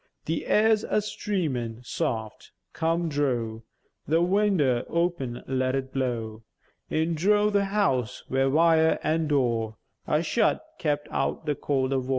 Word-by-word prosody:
The - - -2
aïr's 215 0 +4
a - - 0
streamèn 135 - -3
soft, 110 -2 -3 0.2
come 165 +1 0
drow 125 -7 -1 0.5
The 160 +2 +3
winder 180 -10 +2
open; 170 -8 -1
let 130 0 0
it 130 -1 -4
blow 115 -4 -2 0.5
In 160 +2 0
drough 205 +5 +2
the 200 -1 +3
house, 195 - 0
where 135 +1 +1
vire, 160 +2 +4
an' 160 0 +1
door 115 -6 0 0.3
A 150 +2 +2
shut, 215 - +1
kept 150 -1 -1
out - - -1
the 150 - +1
cwold 135 -1 -1
avore. 130 -1 -2
145 Hz, 140 wpm, -26 LUFS, 125-170 Hz, 0.5 s, aïr's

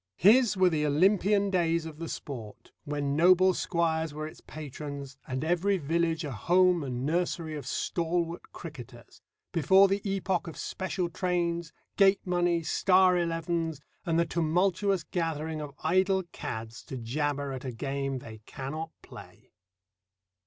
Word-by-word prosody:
His 215 +3 +5
were 185 -1 +4
the 155 -2 0
Olympian 195 +6 +3
days 170 -3 +1
of 160 -1 -8
the 165 -1 -5
sport, 115 -7 -8
when 145 -1 -1
noble 185 +3 +5
squires 160 -3 0
were 155 0 -4
its 155 - -10
patrons, 140 -2 -7
and 130 +1 -3
every 180 +4 +2
village 165 +1 0
a 145 - -4
home 175 - +3
and 125 -1 -3
nursery 165 0 -1
of 140 -4 -7
stalwart 170 +2 -2
cricketers, 130 -7 -11 0.3
before 190 +4 +5
the 195 +1 0
epoch 190 -3 -1
of 165 - -7
special 185 -1 -3
trains, 170 -1 -1 0.3
gate 195 -1 +4
money, 175 -2 +1
star 185 +2 +4
elevens, 165 -2 -1 0.2
and 165 -1 0
the 170 - +3
tumultuous 180 +3 +1
gathering 160 -3 -2
of 145 -2 -7
idle 185 +3 +2
cads 110 +2 -6
to 130 - -6
jabber 140 +4 -2
at 130 -1 -6
a 130 - -4
game 135 +2 -3
they 110 -3 -10
cannot 155 +5 -5
play. - - -13
165 Hz, 145 wpm, -29 LUFS, 145-180 Hz, 0.3 s, His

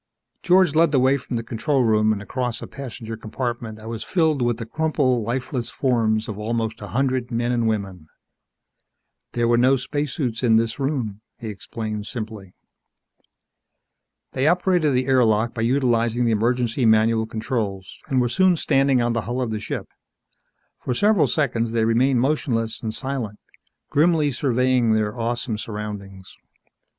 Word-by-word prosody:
George 180 -3 +4
led 165 0 +4
the 140 - +3
way 130 +2 +4
from 130 -2 -5
the 115 - -2
control 130 +4 0
room, 110 -1 +3
and 105 -1 -2
across 125 +1 -3
a - - -7
passenger 120 -4 -7
compartment 115 0 -4
that 110 0 -11
was 115 -2 -5
filled 160 -6 +1
with 120 -2 +1
the 115 - -5
crumpled, 130 -2 0
lifeless 125 +2 -3
forms 110 -4 0
of 105 -1 -6
almost 110 0 -2
a 105 - -6
hundred 130 0 0
men 120 0 -1
and 120 -2 +1
women. 95 -7 -3 1.3
"There 120 -1 +1
were 120 0 +3
no 130 +2 +5
spacesuits 135 -2 -2
in 115 -3 +4
this 115 +2 +1
room," 125 -8 -2 0.2
he 115 - -6
explained 105 0 -5
simply. 110 -5 -7 1.8
They 135 +3 0
operated 175 -4 +2
the 125 0 +1
air 130 -1 +4
lock 110 +1 +2
by 115 - -4
utilizing 120 -1 +1
the 115 - +2
emergency 120 +3 +1
manual 110 0 +3
controls, 110 -4 -4
and 135 -4 +1
were 125 - +2
soon 185 +7 +3
standing 135 -5 +2
on 120 0 +1
the 115 - 0
hull 125 +1 -2
of 125 -3 -1
the 110 - -2
ship. 105 - -5 0.9
For 125 - -3
several 205 - +3
seconds 115 -6 0
they 115 -1 +2
remained 120 +2 +3
motionless 120 -5 -1
and 110 - -3
silent, 120 -3 -4 0.5
grimly 155 -1 +3
surveying 125 -2 +2
their 110 -1 0
awesome 115 -1 -2
surroundings. 105 -3 -7
120 Hz, 160 wpm, -23 LUFS, 110-130 Hz, 1.8 s, no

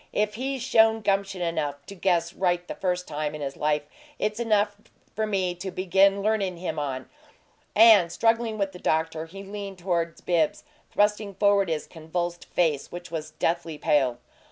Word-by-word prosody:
"If 210 0 +1
he's 265 +2 -3
shown 225 -3 +4
gumption 195 -2 0
enough 145 -4 -2
to - - -9
guess 175 -3 +1
right 175 -1 0
the - - -4
first 180 -1 -2
time 150 0 -3
in 150 - -7
his 140 -1 -4
life, 150 0 0 0.3
it's 215 +1 -1
enough 210 -3 +2 0.4
for 220 0 0
me 190 -4 0
to 180 +2 -6
begin 195 +2 +3
learnin' 200 -4 0
him 170 -3 -3
on!" 130 -3 -3 0.7
And, 210 -6 +7
struggling 225 +1 +1
with 195 -2 -1
the 180 - -11
doctor, 160 0 0
he 195 +4 -9
leaned 200 -1 -7
toward 170 -2 -1
Bibbs, 165 -3 +1 0.3
thrusting 210 -1 +1
forward 200 -1 +3
his 155 -2 -2
convulsed 175 +1 -4
face, 155 -5 0
which 175 -1 -8
was 155 -2 -4
deathly 165 0 -2
pale. 135 -5 +2
180 Hz, 170 wpm, -26 LUFS, 160-205 Hz, 0.7 s, And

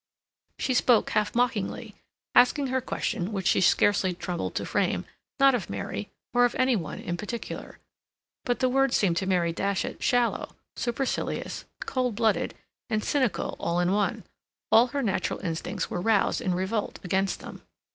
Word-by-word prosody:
She 260 - 0
spoke 245 -2 +3
half 210 +1 0
mockingly, 240 -4 -1 0.4
asking 270 +2 +4
her 260 - +2
question, 190 -5 -2
which 195 -3 -3
she 175 - +3
scarcely 190 0 +3
troubled 180 -1 -4
to - - -1
frame, - - 0 0.3
not 275 0 +6
of 230 -7 -2
Mary, 100 +1 -4 0.2
or 245 0 +5
of 245 - +2
any 255 -1 +3
one 165 -7 -4
in 175 - -4
particular. 215 +6 -6 0.7
But 245 +1 -1
the 255 - +4
words 270 0 +3
seemed 175 -5 +2
to 190 - -1
Mary 175 -3 +2
Datchet 195 +3 -2
shallow, 245 -1 +1 0.2
supercilious, 245 +3 -2 0.2
cold 250 -4 -1
blooded, 220 -1 +1 0.3
and 215 -2 0
cynical 260 -6 0
all 170 +1 0
in 175 +1 +2
one. 205 +1 0 0.5
All 230 +3 +7
her 280 +2 -2
natural 200 -5 0
instincts 175 +3 -3
were 175 - -2
roused 210 0 +2
in 185 -1 0
revolt 195 +4 -2
against 190 +1 0
them. - - -9
210 Hz, 160 wpm, -27 LUFS, 185-245 Hz, 0.7 s, All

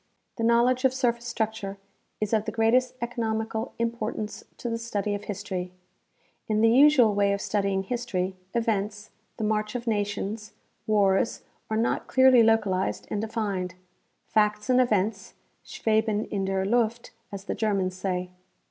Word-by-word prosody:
The 230 - -2
knowledge 240 +2 +3
of 260 -1 +3
sur 255 -2 +3
face 235 0 -15
structure 220 -4 -3 0.4
is 215 +1 -2
of 215 -1 +2
the - - -2
greatest 245 +3 +2
economical 225 -1 -2
importance 230 -2 -3
to - - -5
the 230 -1 -2
study 210 -3 -2
of 205 0 -5
history. 190 -3 -4 0.8
In 215 0 +1
the 225 0 +5
usual 260 -4 +6
way 200 0 +2
of 200 - -2
studying 200 -2 0
history, 195 -5 -2 0.2
events, 210 -2 -1 0.3
the - - -3
march 215 +1 -1
of 240 -1 -3
nations, 210 0 -2 0.3
wars, 200 -1 +2 0.3
are 220 - 0
not 230 +1 0
clearly 260 -2 +6
localized 210 -4 +1
and 210 - -1
defined. 205 -5 -3 0.5
Facts 210 +2 +1
and 255 0 +5
events 210 -3 0
" - - -44
schweben 220 -1 0
in 195 -2 -1
der 190 0 0
Luft," 235 +2 0 0.2
as 195 -1 -6
the - - -3
Germans 195 -4 0
say. 180 -1 -3
215 Hz, 155 wpm, -26 LUFS, 200-235 Hz, 0.8 s, usual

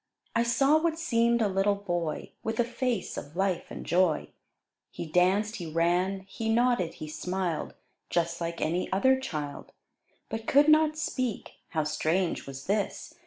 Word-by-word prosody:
I 230 - +4
saw 270 +6 +4
what 330 -1 +1
seem'd 235 -7 +2
a - - +3
little 195 +1 +2
Boy, 175 -5 -3
With 225 +1 -3
a - - +5
face 240 -3 -2
of 145 +3 -7
life 190 -1 0
and - - -7
joy; 175 -2 +2 0.6
He - - -6
danced, 190 +6 +2
he 175 -4 -5
ran, 175 +4 +1
he 220 +4 -5
nodded, 235 -6 +2
he 155 - -7
smiled, 180 +1 -3 0.3
Just 170 0 0
like 170 0 -3
any 170 +3 -1
other 260 +8 +4
Child; 150 - -5 0.5
But 225 0 -5
could 290 +2 +5
not 310 0 +5
speak, 255 -7 -2 0.2
(how 160 -2 0
strange 160 +4 0
was 135 0 -8
this!) 205 +9 -2
195 Hz, 160 wpm, -28 LUFS, 170-235 Hz, 0.6 s, a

